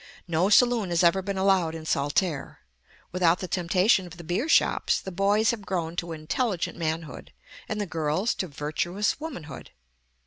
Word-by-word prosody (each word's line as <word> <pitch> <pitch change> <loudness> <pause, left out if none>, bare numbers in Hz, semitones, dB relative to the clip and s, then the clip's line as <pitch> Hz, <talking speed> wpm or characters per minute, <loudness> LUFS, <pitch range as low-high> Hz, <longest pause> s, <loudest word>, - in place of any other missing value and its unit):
No 170 +3 +1
saloon 235 -3 +4
has 170 0 +2
ever 175 +3 +4
been 200 +1 -4
allowed 190 -4 +2
in 160 -1 -8
Saltaire. 145 +2 -1 0.5
Without 175 -1 +3
the 185 - -5
temptation 185 +2 +2
of 175 0 -12
the 170 - -9
beer 185 - -2
shops, - - +3
the 190 - -7
boys 200 +4 +2
have 235 -3 -5
grown 170 -3 -3
to 170 -1 -3
intelligent 165 +5 -2
manhood, 160 -4 -4 0.4
and 215 - -2
the 205 - -1
girls 165 +5 -1
to 185 - -3
virtuous 170 - -2
womanhood. 265 - -8
180 Hz, 165 wpm, -26 LUFS, 165-200 Hz, 0.5 s, saloon